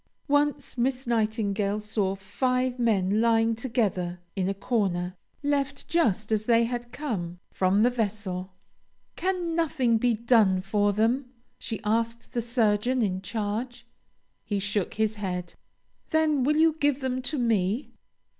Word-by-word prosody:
Once 290 -2 0
Miss 255 +2 0
Nightingale 215 -3 0
saw 210 -2 -1
five 250 +6 -1
men 210 -3 +2
lying 230 0 +3
together 210 -7 -1 0.2
in 190 -1 0
a - - 0
corner, 190 -5 -1 0.3
left 280 -1 -1
just 220 - +1
as 215 -1 0
they 230 -1 +5
had 240 0 -3
come 210 - -4
from 190 +3 +2
the 245 - +5
vessel. 200 -5 -3 0.6
"Can 360 -2 -1
nothing 265 -9 +2
be 240 0 +2
done 220 -5 +4
for 205 +1 +2
them?" 240 +5 +1 0.3
she 225 - -4
asked 230 +2 -1
the 240 - 0
surgeon 235 +1 +1
in 190 -2 -1
charge. 215 +5 -4 0.6
He 205 -2 -2
shook 200 -1 -1
his 220 0 0
head. 180 -3 -3 0.6
"Then 310 -4 +2
will 300 +3 +2
you 320 0 +4
give 290 -2 +2
them 260 -1 -1
to 275 +4 -2
me?" 225 0 0
225 Hz, 140 wpm, -27 LUFS, 205-255 Hz, 0.6 s, they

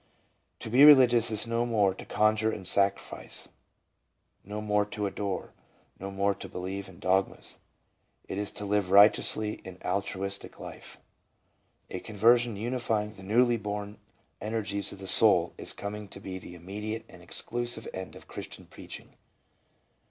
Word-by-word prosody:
To 110 - -6
be 130 +4 +6
religious 125 -6 +7
is 110 0 -2
no 115 +1 0
more 105 -5 +2
to - - -11
coDJure 110 +1 +2
and 95 -4 -5
sacrifice, 100 +1 -1 0.9
no 105 +2 -6
more 105 -1 +1
to 105 0 -4
adore, 100 -1 -4 0.5
no 100 - -5
more 100 +1 +1
to - - -9
believe 95 +2 -5
in 90 - -14
dogmas; 95 +1 -1 0.7
it 95 - -4
is 105 - -3
to 105 - -6
live 100 -2 0
righteously 105 +2 +4
an 95 -1 -10
altruistic 100 0 -3
life. - - -10 0.9
A 90 - -4
conversion 115 +3 +3
unifying 110 -1 -2
the 95 - -14
newly 120 +5 +3
born 105 -1 -5 0.4
energies 105 -2 -2
of - - -9
the 95 0 -8
soul 90 -4 +7
is - - -4
coming 105 +1 -6
to 100 - -11
be 95 -1 -6
the 90 - -11
immediate 105 +6 -6
and - - -15
exclusive 120 -1 -3
end 95 0 -7
of - - -14
Christian - - -9
preaching. - - -11
105 Hz, 150 wpm, -29 LUFS, 95-110 Hz, 0.9 s, religious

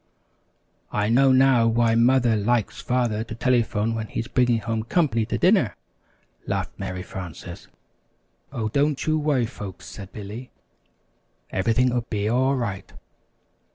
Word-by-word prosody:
"I 105 0 0
know 135 +3 +5
now 130 -3 +5
why 115 0 +2
Mother 120 0 +4
likes 110 +1 0
Father 120 -4 0
to 115 -1 -8
telephone 115 -3 +1
when 110 -1 -3
he's 115 - -4
bringing 125 -2 +2
home 115 0 -2
company 115 -3 +1
to - - -1
dinner," - - +3 0.7
laughed - - -2
Mary 95 -2 -4
Frances. 90 -2 -8 0.8
"Oh, 110 -2 -2
don't 145 +4 0
you 155 0 +1
worry, 145 -5 +1
folks," 105 -6 -9
said 100 -1 -9
Billy, 110 +5 -8 1.0
"everything'll 120 +5 +1
be 105 -3 -3
all 130 +4 +2
right." 105 -6 -4
115 Hz, 130 wpm, -24 LUFS, 105-125 Hz, 1.0 s, know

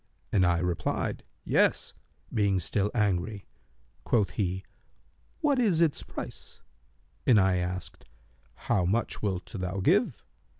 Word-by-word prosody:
and 95 -3 +4
I 85 -1 +3
replied, 90 0 -1 0.2
'Yes,' - - +2 0.4
being 100 -4 +2
still 100 +4 0
angry. 100 -1 0 0.6
Quoth 105 -5 +2
he, 95 -2 -2 0.8
'What 290 -4 +3
is 200 -9 +3
its 165 -4 +2
price?' - - -8 0.7
And 115 -5 +7
I 95 -1 +3
asked, 90 0 -4 0.5
'How 95 - 0
much 105 +7 0
wilt 95 -4 -1
thou 95 -3 -4
give?' 95 - +2
95 Hz, 120 wpm, -28 LUFS, 90-110 Hz, 0.8 s, And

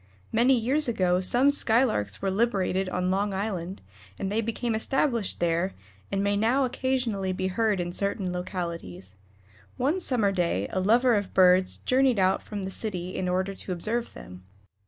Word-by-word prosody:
Many 245 +4 +4
years 265 +6 +2
ago 185 -6 +1
some 250 +9 +4
Skylarks 220 - +1
were 195 - +1
liberated 195 -3 0
on 180 0 -1
Long 200 +1 0
Island, 190 -2 -4 0.3
and 195 - -3
they 220 +2 +1
became 230 +1 -2
established 235 -1 0
there, 170 +2 0 0.4
and 195 0 0
may 200 0 +1
now 235 +6 +2
occasionally 245 -7 -1
be 185 +1 -2
heard 210 0 0
in 175 0 -3
certain 200 -1 -2
localities. 170 - -5 0.6
One 295 +9 +1
summer 235 - +1
day 170 - 0
a 185 - -1
lover 235 +6 +3
of 205 -3 -2
birds 185 0 +4
journeyed 255 -2 +2
out 190 0 +2
from 205 -2 -6
the 190 - -4
city 185 -4 -4
in 180 - -2
order 185 +2 -1
to 190 - -7
observe 220 +7 -3
them. 90 0 -11
195 Hz, 165 wpm, -26 LUFS, 185-235 Hz, 0.6 s, Many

